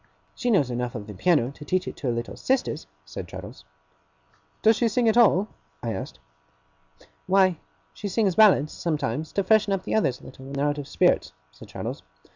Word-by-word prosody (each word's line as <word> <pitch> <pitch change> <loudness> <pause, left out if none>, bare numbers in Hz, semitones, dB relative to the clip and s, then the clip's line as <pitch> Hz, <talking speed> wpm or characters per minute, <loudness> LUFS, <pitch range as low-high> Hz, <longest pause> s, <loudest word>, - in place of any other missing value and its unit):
'She 245 - -2
knows 145 - +3
enough 120 0 -3
of 105 -3 -5
the 105 - -9
piano 140 - +2
to 145 - -12
teach 185 +4 -1
it - - -5
to 135 - -5
her - - +2
little 115 0 -4
sisters,' 255 - -1 0.2
said 75 - -7
Traddles. - - -10 1.0
'Does 220 +1 +6
she 235 - +1
sing 230 +2 +1
at 220 - +3
all?' 210 -4 +5 0.4
I - - -2
asked. - - -6 1.1
'Why, 185 -2 +3 0.3
she - - -6
sings 200 -1 +1
ballads, 185 -8 +5
sometimes, 155 -2 -2
to 200 - +1
freshen 210 0 +3
up 195 - -2
the - - -4
others 135 - +1
a - - -20
little 130 0 -12
when 135 - -9
they're 140 +1 0
out 145 0 -1
of 140 - -6
spirits,' 75 - +2 0.2
said - - -14
Traddles. - - -6
170 Hz, 200 wpm, -25 LUFS, 130-210 Hz, 1.1 s, Does